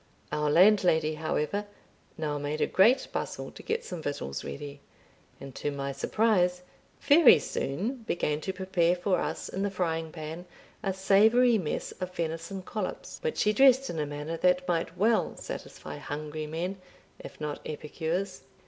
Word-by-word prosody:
Our 150 0 0
landlady, 170 -2 +5
however, 155 +6 -2 0.5
now 150 -2 -2
made 145 +2 -3
a - - +3
great 235 +8 +4
bustle - - -4
to - - -11
get 455 +1 -2
some 175 -3 -6
victuals 70 - -4
ready, 140 -1 -7 0.6
and, 135 -1 -9
to 145 - -3
my 140 -1 -3
surprise, 180 +3 +1 0.4
very 290 - +7
soon 185 - -2
began 165 -9 -2
to 190 - -2
prepare 185 -2 +1
for 180 +1 0
us - - -3
in 190 - -4
the 200 - +1
frying 165 -4 -2
pan 160 +2 -7 0.3
a 195 -3 0
savoury 215 +5 +4
mess 160 -5 -3
of 185 -1 -5
venison 165 +3 -3
collops, 205 0 -5
which 475 -2 -2
she 210 - +3
dressed 270 +3 +5
in 165 - -4
a 150 - -1
manner 150 +3 -4
that 180 +1 +2
might 165 0 -1
well 220 +4 +2
satisfy - - -7
hungry 150 +2 -5
men, 180 +5 -4 0.4
if - - -11
not 150 -1 -4
epicures. 160 +2 -3
175 Hz, 155 wpm, -29 LUFS, 150-200 Hz, 0.6 s, very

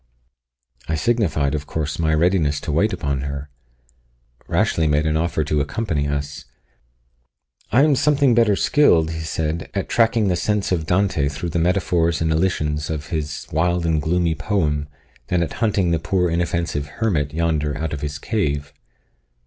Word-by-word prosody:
I 80 - 0
signified, 80 -7 +1
of 75 -1 -3
course, 75 -1 -3
my 80 -1 +1
readiness 80 -3 +2
to 80 - -3
wait 100 +9 +2
upon 70 -7 -2
her. 70 +1 -5 1.0
Rashleigh 80 -1 +1
made 75 +1 +2
an 80 0 +1
offer 80 -1 0
to 75 0 0
accompany 75 -1 -2
us. 70 -1 -4 1.3
"I 125 +7 +5
am 150 -2 +4
something 140 -2 +3
better 115 -3 +4
skilled," 85 - +3
he 80 - -4
said, 80 0 -3
"at - - -2
tracking 115 -2 +2
the 90 - +2
sense 105 +2 -1
of 80 -3 -1
Dante 90 -6 +1
through 75 +4 -4
the 85 - -1
metaphors 85 -1 +1
and 80 -1 0
elisions 75 -3 0
of 80 -1 -4
his 75 -3 -3
wild 85 +2 +1
and 80 -2 +1
gloomy 85 +2 +1
poem, 75 -6 -1 0.4
than 90 -1 +1
at - - -4
hunting 100 -6 +2
the 85 - +1
poor 90 +1 0
inoffensive 85 -3 -1
hermit 80 -11 0
yonder 75 -2 -1
out 80 0 -3
of 70 - -5
his 75 -1 -4
cave." 75 -6 -2
80 Hz, 165 wpm, -21 LUFS, 75-90 Hz, 1.3 s, I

